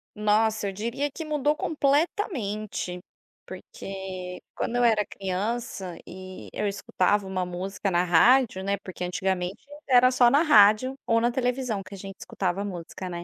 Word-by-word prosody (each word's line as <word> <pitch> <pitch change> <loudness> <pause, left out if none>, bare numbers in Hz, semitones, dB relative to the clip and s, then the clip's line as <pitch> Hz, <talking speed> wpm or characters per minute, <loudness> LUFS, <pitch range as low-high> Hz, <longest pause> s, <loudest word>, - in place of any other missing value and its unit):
Nossa, 215 0 +2
eu - - -2
diria 235 +8 -2
que 320 +3 -7
mudou 300 0 +1
completamente, 275 - -1 0.5
porque 190 - -7 0.2
quando 240 - -2
eu 245 - +2
era 220 -3 +4
criança 195 -1 -4
e 185 +1 -10
eu 210 - -1
escutava 200 0 0
uma 185 -1 -2
música 185 +2 -3
na 175 -1 +2
rádio 190 +4 +4
né, 200 +1 0
porque 180 -1 -7
antigamente 185 +2 -2 0.3
era 255 0 +6
só 245 -1 +5
na 285 +5 +4
rádio 215 -2 +6
ou 230 0 +4
na 240 +1 +2
televisão 250 -3 -1
que 195 +1 -10
a - - -10
gente 195 0 -8
escutava 190 +1 -2
música, 185 -1 -6
né. 175 -1 -5
205 Hz, 155 wpm, -26 LUFS, 185-245 Hz, 0.5 s, era